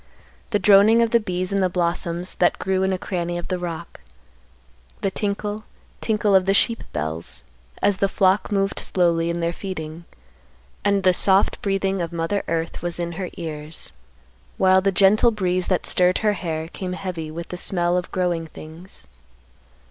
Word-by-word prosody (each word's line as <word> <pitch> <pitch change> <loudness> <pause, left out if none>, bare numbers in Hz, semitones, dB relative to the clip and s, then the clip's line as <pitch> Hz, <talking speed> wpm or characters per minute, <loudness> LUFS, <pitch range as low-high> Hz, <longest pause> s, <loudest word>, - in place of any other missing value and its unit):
The 210 - +2
droning 210 +3 +6
of 230 - 0
the 235 - +5
bees 185 -2 -2
in 195 - +1
the 185 - +2
blossoms 175 0 -2
that 175 - +3
grew 190 0 0
in 190 0 +1
a 185 - 0
cranny 175 -2 -3
of 175 - -6
the 185 -1 -1
rock; 170 - -6 1.0
the 195 - 0
tinkle, 205 +1 -3 0.4
tinkle 215 -2 +1
of 190 -1 +4
the 195 - +3
sheep 230 +2 +2
bells, 80 +2 -4 0.4
as 200 -2 +3
the 195 - +2
flock 190 +2 +2
moved 195 -1 0
slowly 170 -2 +1
in 170 0 -2
their 170 +1 0
feeding; 170 -3 -6 0.8
and 200 -1 +2
the 185 -1 +5
soft 190 +2 +4
breathing 195 -1 0
of 170 -1 -3
Mother 170 +4 -1
Earth 165 0 -2
was 175 0 -2
in 170 0 -2
her 180 +1 -5
ears; 155 - -5 0.6
while 190 0 +5
the 195 +1 +2
gentle 200 +5 +5
breeze 185 -4 -1
that 185 - 0
stirred 180 0 +3
her 210 - +4
hair 160 -4 -4
came 180 +1 -5
heavy 180 -4 -5
with 165 +2 -7
the - - -5
smell 175 -1 0
of 180 0 -2
growing 175 -3 -1
things. 160 - -12
185 Hz, 175 wpm, -22 LUFS, 170-195 Hz, 1.0 s, droning